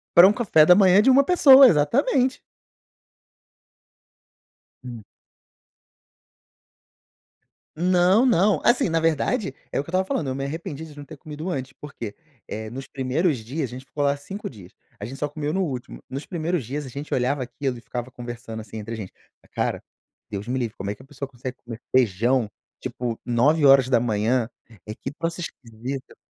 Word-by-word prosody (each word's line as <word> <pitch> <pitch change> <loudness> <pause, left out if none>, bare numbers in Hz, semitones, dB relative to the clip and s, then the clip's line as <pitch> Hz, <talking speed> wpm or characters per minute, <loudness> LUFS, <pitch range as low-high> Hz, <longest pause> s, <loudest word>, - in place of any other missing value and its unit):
Pra 175 +2 +10
um 200 - +3
café 195 -9 +4
da 180 - +7
manhã 195 0 +6
de 250 - +4
1 270 +2 +6
pessoa, 275 -5 +8
exatamente. 250 - +2 2.4
Hum. 120 -4 -8 2.7
Não, 180 +6 +3
não. 210 -4 +3
Assim, 240 -5 +3
na 165 0 +1
verdade, 165 - 0 0.2
é - - -2
o - - +2
eu - - +2
estava 185 +6 -1
falando: 165 -5 -2
eu 130 - -2
me 135 - -3
arrependi 160 +2 -5
de 150 -2 -14
não 145 - -9
ter - - -11
comido 155 +3 -7
antes. 135 -5 -4
Por 150 0 -11
quê? 105 -3 -7 0.3
Eh, 110 0 -6
nos 130 +4 -8
primeiros 135 +4 0
dias 130 +5 -4
a - - -11
gente 130 +1 -9
ficou 145 +2 -3
lá 140 0 +2
5 195 +8 -7
dias. 100 -8 -14 0.3
A 100 - -5
gente 130 +5 -8
só 150 - -2
comeu 150 0 -3
no 190 - 0
último. 130 -7 -6
Nos 135 +3 -6
primeiros 170 - -2
dias, 145 +5 -4
a - - -8
gente 140 +4 -6
olhava 130 +2 0
aquilo 130 0 -4
e - - -12
ficava 120 +2 -6
conversando, 120 -2 -7
assim, 110 0 -10
entre 110 +2 -6
gente: 105 -4 -8 0.4
"Cara, - - -1 0.5
Deus 100 +2 -5
me 125 +2 -1
livre, 115 -4 -3
como 100 - -4
é 105 - -3
que 105 - -17
a - - -17
pessoa 140 -1 -7
consegue 125 -1 -7
comer 115 -2 -8 0.2
feijão, 120 0 +2 0.3
tipo, 120 -2 -4
9h? 125 -4 +3 0.4
Eh, 105 - -6
que 135 - -6
troço 165 +3 -4
esquisito". 130 -2 -7
140 Hz, 175 wpm, -24 LUFS, 120-165 Hz, 2.7 s, Pra